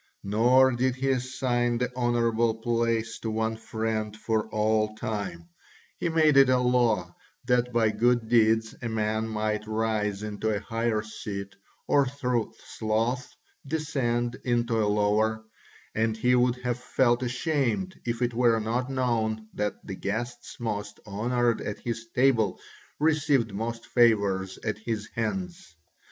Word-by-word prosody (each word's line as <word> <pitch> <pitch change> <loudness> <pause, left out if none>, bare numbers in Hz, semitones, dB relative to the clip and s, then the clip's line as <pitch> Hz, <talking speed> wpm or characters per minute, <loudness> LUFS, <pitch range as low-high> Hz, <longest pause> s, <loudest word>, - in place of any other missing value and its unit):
Nor 125 +6 +4
did 125 +1 0
he 135 +1 0
assign 125 -2 0
the 125 +1 -2
honourable 115 -2 +1
place 115 -1 -1
to 115 - -3
one 110 +1 -1
friend 110 -1 -3
for 110 0 -1
all 110 0 +1
time; 95 -7 -4 0.5
he - - 0
made 155 -3 +4
it 135 -1 +7
a 130 - +4
law 125 -3 +1 0.3
that 125 0 +2
by 115 -2 +3
good 120 +1 +2
deeds 110 -1 +3
a 120 - -3
man 110 0 -1
might 105 -1 -2
rise 110 -2 -1
into 105 +1 -2
a 105 -2 0
higher 115 -1 -1
seat 100 -2 -6 0.3
or 140 -2 +4
through 125 -4 -1
sloth 115 +4 -2 0.3
descend 125 -5 -1
into 120 -2 +1
a 105 - +1
lower; 105 +2 +1 0.5
and 110 0 0
he 125 +3 +2
would 125 0 +3
have 125 -1 -1
felt 120 -1 +2
ashamed 140 - -1
if 120 +1 -2
it 120 0 0
were 115 -1 +3
not 120 +4 -1
known 110 -4 -1
that 105 0 -3
the - - -5
guest 120 +6 -4
most 105 -3 -4
honoured 120 +3 0
at 105 - -4
his 115 -1 -5
table 120 -7 +3 0.4
received 145 -7 +2
most 115 +3 -4
favours 100 -5 +2
at 110 -1 -2
his 110 -1 -3
hands. 175 - -4
115 Hz, 140 wpm, -27 LUFS, 110-125 Hz, 0.5 s, it